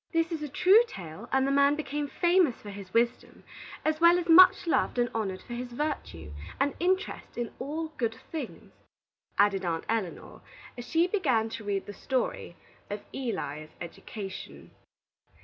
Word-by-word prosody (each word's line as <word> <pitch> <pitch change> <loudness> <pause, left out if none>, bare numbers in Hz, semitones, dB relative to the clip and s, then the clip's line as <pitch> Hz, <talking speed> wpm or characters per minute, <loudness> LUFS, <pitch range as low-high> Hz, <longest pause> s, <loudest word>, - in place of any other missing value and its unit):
"This 330 0 +1
is 325 -2 -3
a 300 - -4
true 380 - +6
tale, 180 - -9
and 265 0 +3
the 275 - +1
man 280 +1 +4
became 295 -1 -3
famous 345 -4 +3
for 205 - -9
his 195 -2 -9
wisdom, 235 +2 0 0.4
as 310 +1 0
well 340 +1 +7
as 355 -1 -2
much 365 +3 +8
loved 330 - +1
and 240 0 +1
honored 195 -4 -3
for 240 - -8
his 245 +1 -5
virtue, 235 - -4 0.3
and 275 +1 +2
interest 370 +2 -1
in 240 -2 -3
all 310 +4 -3
good 225 -2 -1 0.2
things," 320 - -6 0.6
added 200 -2 +3
Aunt 165 -2 -2
Elinor, 220 -6 -3 0.4
as 245 -1 -8
she 330 +1 +3
began 265 - +1
to 220 - -7
read 200 -2 -2
the 205 - -8
story 250 -6 -2 0.3
of 205 0 -5
ELI'S 155 - -4
EDUCATION. 195 +3 -8
250 Hz, 165 wpm, -29 LUFS, 205-320 Hz, 0.6 s, much